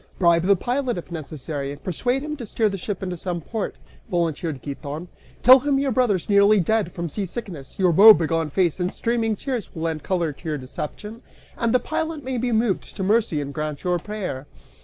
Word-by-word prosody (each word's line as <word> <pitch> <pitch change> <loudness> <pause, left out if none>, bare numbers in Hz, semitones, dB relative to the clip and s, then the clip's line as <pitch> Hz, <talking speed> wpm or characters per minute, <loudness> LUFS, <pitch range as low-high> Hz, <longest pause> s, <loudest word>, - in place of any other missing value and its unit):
"Bribe 170 -2 +4
the 200 - +6
pilot, 245 +3 -1
if 175 - -8
necessary, 150 -3 -5
and 145 +1 -10
persuade 245 - -1
him 300 0 -4
to 245 - -6
steer 220 +1 +1
the 195 - -4
ship 200 +2 -4
into 180 -1 -3
some 175 0 -3
port," 215 +6 -4 0.3
volunteered 165 - -1
Giton; 145 +4 -6 0.3
"tell 255 +2 +9
him 280 +1 +1
your 275 -1 +1
brother's 220 -8 +1
nearly 200 +1 +5
dead 205 0 +1
from 170 0 -4
seasickness: 185 - -6
your 185 -2 +3
woebegone 165 -4 +6
face 175 +2 +1
and 180 +1 0
streaming 230 -2 0
tears 245 -1 -4
will 160 - -4
lend 160 -2 -2
color 170 -4 -1
to 160 +4 -8
your 150 - -1
deception, 150 - -7 0.3
and 230 -1 0
the 250 - +4
pilot 315 +2 -3
may 255 -1 -2
be 245 +1 -1
moved 220 -3 0
to 195 - -3
mercy 205 -6 +2
and 140 0 -6
grant 150 -1 -4
your 180 -1 +1
prayer." 180 -9 -5
185 Hz, 200 wpm, -23 LUFS, 160-230 Hz, 0.3 s, tell